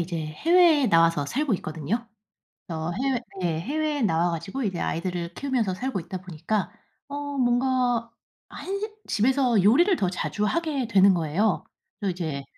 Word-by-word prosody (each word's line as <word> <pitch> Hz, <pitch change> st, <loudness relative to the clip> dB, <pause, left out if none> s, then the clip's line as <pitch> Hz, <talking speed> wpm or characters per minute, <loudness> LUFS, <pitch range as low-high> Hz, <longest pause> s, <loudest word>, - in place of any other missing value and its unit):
이제 170 Hz, 0 st, -3 dB
해외에 320 Hz, -, +4 dB
나와서 165 Hz, -6 st, +4 dB
살고 275 Hz, -, 0 dB
있거든요. 165 Hz, +8 st, -3 dB, 0.6 s
저 160 Hz, 0 st, -3 dB
해외 265 Hz, -3 st, +1 dB, 0.2 s
예 165 Hz, -3 st, 0 dB
해외에 295 Hz, -, -1 dB
나와 175 Hz, -4 st, +2 dB
가지고 190 Hz, +11 st, -4 dB
이제 190 Hz, -5 st, -2 dB
아이들을 175 Hz, 0 st, -3 dB
키우면서 245 Hz, -8 st, -1 dB
살고 250 Hz, +1 st, -3 dB
있다 175 Hz, +2 st, -6 dB
보니까 185 Hz, +4 st, -3 dB, 0.4 s
어 285 Hz, 0 st, -5 dB
뭔가 245 Hz, -1 st, +1 dB, 0.4 s
한식 395 Hz, +3 st, -5 dB
집에서 245 Hz, -1 st, +2 dB
요리를 320 Hz, -, +5 dB
더 185 Hz, -, 0 dB
자주 180 Hz, +3 st, -2 dB
하게 300 Hz, -1 st, 0 dB
되는 195 Hz, -3 st, +5 dB
거예요. 175 Hz, +5 st, 0 dB, 0.4 s
그래서 200 Hz, -3 st, 0 dB
이제 155 Hz, -6 st, -4 dB
210 Hz, 330 characters per minute, -25 LUFS, 170-270 Hz, 0.6 s, 요리를